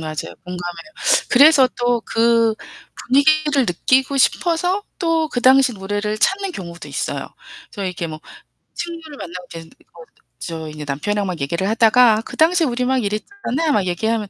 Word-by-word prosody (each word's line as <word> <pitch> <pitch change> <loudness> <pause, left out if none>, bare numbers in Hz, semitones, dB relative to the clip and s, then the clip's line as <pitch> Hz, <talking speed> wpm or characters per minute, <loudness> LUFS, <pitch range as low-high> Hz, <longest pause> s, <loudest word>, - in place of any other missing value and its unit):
맞아요. 155 -1 -6
공감해요. 180 - -7 0.4
그래서 275 0 +6
또 245 -1 +1
그 230 -1 +2 0.5
분위기를 290 0 +3
느끼고 260 +9 +1
싶어서 355 +7 +1 0.2
또 330 -3 0
그 245 - -3
당시 260 0 +5
노래를 205 +2 -3
찾는 390 - 0
경우도 170 - -8
있어요. - - -4 0.4
저 200 - -6
이렇게 180 -2 -4
뭐 155 -1 -8 0.5
친구를 330 -3 -7
만나고 180 0 -8
쟤네들이 165 -1 -12
거기서 165 -1 -16
또 - - -35
저 160 -2 -6
인제 150 -1 -8
남편하고 200 +9 -2
막 180 -2 -4
얘기를 170 +7 -2
하다가 225 0 +4
"그 - - -9
당시에 330 +1 +4
우리 250 -1 -1
막 260 -3 +1
이랬잖아." 305 - -3
막 195 -6 +1
얘기하면 215 +4 -1
230 Hz, 360 characters per minute, -19 LUFS, 180-290 Hz, 0.5 s, 그래서